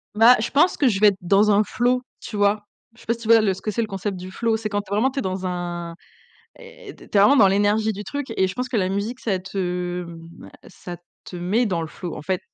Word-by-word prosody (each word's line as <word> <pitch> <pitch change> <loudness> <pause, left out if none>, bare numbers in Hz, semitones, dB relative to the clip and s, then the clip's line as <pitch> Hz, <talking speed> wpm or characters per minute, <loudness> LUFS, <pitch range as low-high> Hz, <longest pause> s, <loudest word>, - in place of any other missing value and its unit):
Bah, 230 +3 +7
je 220 - -2
pense 320 +6 +3
que 280 - +2
je 195 -4 +1
vais 210 - +6
être 195 - -4
dans 200 +4 +3
un 205 +1 +4
flow, 250 +3 0 0.2
tu 215 - -8
vois? 205 +1 +1 0.3
Je - - -19
sais - - -17
pas 230 - +1
si 235 - -10
tu 220 - -7
vois? 225 -1 +6
Le 195 -3 +1
ce 190 - -11
que 215 - -3
c'est 230 +3 -1
le 220 - -2
concept 195 -1 -4
du 185 +1 -8
flow. 225 +1 0
C'est 215 - -4
quand 205 0 -2
vraiment 220 +6 +1
tu 275 - -3
es - - -1
dans 185 -1 -3
un 175 -2 -4 0.6
eh, 480 -4 -12
tu - - -15
es - - -18
tu 205 - +1
es - - +7
vraiment 275 +8 +6
dans 200 -5 +6
l'énergie 205 +2 +2
du 205 +1 -7
truc 275 +2 -5
et 190 - +2
je 185 - -6
pense 255 0 -3
que 230 - 0
la 185 -1 0
musique, 210 +6 -3
ça 195 -5 -1
te, 180 -1 -3
mmh, 165 -1 -11
bah, - - -12 0.2
ça 175 -1 -9 0.3
te 180 - -9
met 205 +8 0
dans 170 -4 -1
le - - -4
flow, 175 0 -7
en - - -8
fait. 185 +4 -2
205 Hz, 290 wpm, -22 LUFS, 185-230 Hz, 0.6 s, Bah